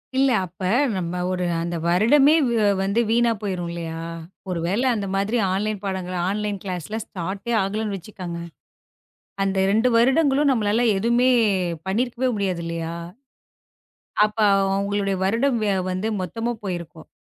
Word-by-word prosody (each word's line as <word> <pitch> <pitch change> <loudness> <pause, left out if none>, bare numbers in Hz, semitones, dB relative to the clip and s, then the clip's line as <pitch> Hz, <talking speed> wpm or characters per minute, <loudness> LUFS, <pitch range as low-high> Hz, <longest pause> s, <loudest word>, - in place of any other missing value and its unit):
இல்ல 270 +1 +4 0.2
அப்ப 180 +1 -16 0.4
நம்ம 175 -1 -3 0.2
ஒரு 180 -1 -1 0.2
அந்த 170 +1 -3
வருடமே 235 - +5 0.2
வ - - -1 0.3
வந்து 200 +4 +1
வீணா 235 +1 +3
போயிரும் 185 -4 -3
இல்லையா? 165 -1 -5 0.5
ஒருவேளை 180 +7 -1
அந்த 200 -2 -3
மாதிரி 200 +5 0 0.2
ஆன்லைன் 210 +1 -2
பாடங்கள் 185 -2 -3
ஆன்லைன் 205 0 -2
கிளாஸ் 180 -5 -4 0.2
ஸ்டார்ட்டே 195 +6 -4
ஆகலைன்னு 205 +1 -2
வச்சுக்கோங்க. 180 -2 -7 1.0
அந்த 195 0 0
2 225 +5 +3
வருடங்களும் 275 +3 +3
நம்மளால 225 -1 +2
எதுவுமே 235 +5 +2 0.6
பண்ணிருக்கவே 240 +5 0
முடியாது 185 -4 -1
இல்லையா? 165 0 -4 1.3
அப்ப 215 +1 -12 0.4
அவங்களுடைய 200 0 0
வருடம் 235 +6 +1 0.3
வந்து 185 +4 -2
மொத்தமா 225 +6 -3
போயிருக்கும். 170 -4 -6
200 Hz, 120 wpm, -23 LUFS, 180-230 Hz, 1.3 s, வருடமே